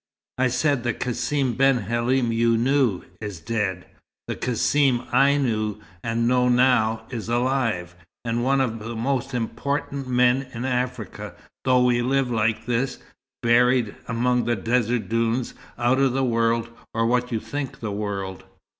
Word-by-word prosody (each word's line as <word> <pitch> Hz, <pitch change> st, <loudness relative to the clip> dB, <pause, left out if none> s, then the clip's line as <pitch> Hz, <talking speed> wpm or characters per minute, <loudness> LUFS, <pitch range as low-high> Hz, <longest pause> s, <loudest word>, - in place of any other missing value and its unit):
"I 130 Hz, -, +4 dB
said 130 Hz, +2 st, +1 dB
the 120 Hz, -2 st, -1 dB
Cassim 130 Hz, +1 st, -1 dB
ben 135 Hz, 0 st, +4 dB
Halim 120 Hz, +1 st, 0 dB
you 115 Hz, 0 st, +2 dB
knew, 125 Hz, -5 st, +2 dB, 0.2 s
is 105 Hz, -5 st, -5 dB
dead. 95 Hz, -1 st, -2 dB, 0.4 s
The -, -, -3 dB
Cassim 125 Hz, +1 st, +1 dB
I 140 Hz, +1 st, +4 dB
knew, 110 Hz, -6 st, -1 dB, 0.2 s
and 115 Hz, +1 st, 0 dB
know 125 Hz, 0 st, +3 dB
now, 120 Hz, -3 st, +3 dB
is 115 Hz, -2 st, -5 dB
alive 120 Hz, -8 st, 0 dB, 0.3 s
and 115 Hz, +1 st, -1 dB
one 135 Hz, +1 st, +2 dB
of 115 Hz, -3 st, -1 dB
the 115 Hz, +2 st, -6 dB
most 130 Hz, +2 st, -1 dB
important 135 Hz, +3 st, -3 dB
men 125 Hz, +1 st, +2 dB
in 120 Hz, +2 st, -4 dB
Africa, 125 Hz, -4 st, -3 dB, 0.3 s
though 125 Hz, -1 st, +4 dB
we 120 Hz, -1 st, +3 dB
live 130 Hz, 0 st, +1 dB
like 115 Hz, -1 st, 0 dB
this, 125 Hz, +2 st, -1 dB, 0.5 s
buried 120 Hz, -1 st, +3 dB
among 125 Hz, +1 st, +1 dB
the 120 Hz, 0 st, +1 dB
desert 115 Hz, +2 st, 0 dB
dunes, 115 Hz, +2 st, 0 dB, 0.2 s
out 120 Hz, +2 st, +2 dB
of 135 Hz, -2 st, +3 dB
the 135 Hz, +1 st, +1 dB
world 115 Hz, -1 st, +1 dB, 0.3 s
or 115 Hz, 0 st, +2 dB
what 125 Hz, +1 st, +1 dB
you'd 110 Hz, -2 st, -2 dB
think 145 Hz, -2 st, -5 dB
the 110 Hz, -2 st, -4 dB
world." 100 Hz, -2 st, -4 dB
120 Hz, 155 wpm, -24 LUFS, 115-130 Hz, 0.5 s, I